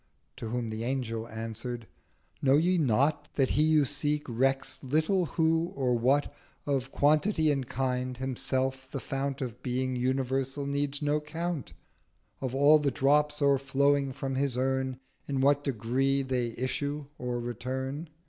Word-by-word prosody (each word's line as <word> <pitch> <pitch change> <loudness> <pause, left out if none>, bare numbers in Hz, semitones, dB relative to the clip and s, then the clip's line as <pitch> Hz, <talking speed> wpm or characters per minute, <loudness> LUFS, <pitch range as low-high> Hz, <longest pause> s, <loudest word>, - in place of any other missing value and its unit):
To 115 - -5
whom 120 0 -2
the 110 +1 -4
Angel 115 -3 -2
answer'd—'Know 115 +4 -3
ye 175 +3 +3
not 145 +3 +2
That 135 -2 +2
He 150 - +2
you 155 -2 +4
seek 145 +2 -1
recks 135 +4 0
little 160 +7 +1
who 165 +1 +2
or 130 -3 +1
what 130 +5 +2 0.3
1360 135 -3 0
Of - - -27
Quantity 155 +2 +3
and 135 -3 -1
Kind—himself 130 +1 -2
the 135 - -4
Fount 135 +1 -3
Of 125 -1 -6
Being 130 +1 -1
Universal 130 +2 -1
needs 140 +1 -1
no 150 +1 +1
Count 165 -1 -4 0.7
Of 130 -1 -2
all 145 +3 +6
the 145 -1 +1
Drops 150 +3 +2
o'erflowing 140 0 +3
from 135 +1 -3
his 135 -1 0
Urn, 130 0 0 0.3
In 140 -2 -1
what 145 +2 +3
Degree 135 +2 +1
they 125 -3 -1
issue 140 +3 -2
or 125 -1 -2
return?' 130 +6 -4
135 Hz, 145 wpm, -29 LUFS, 125-145 Hz, 0.7 s, all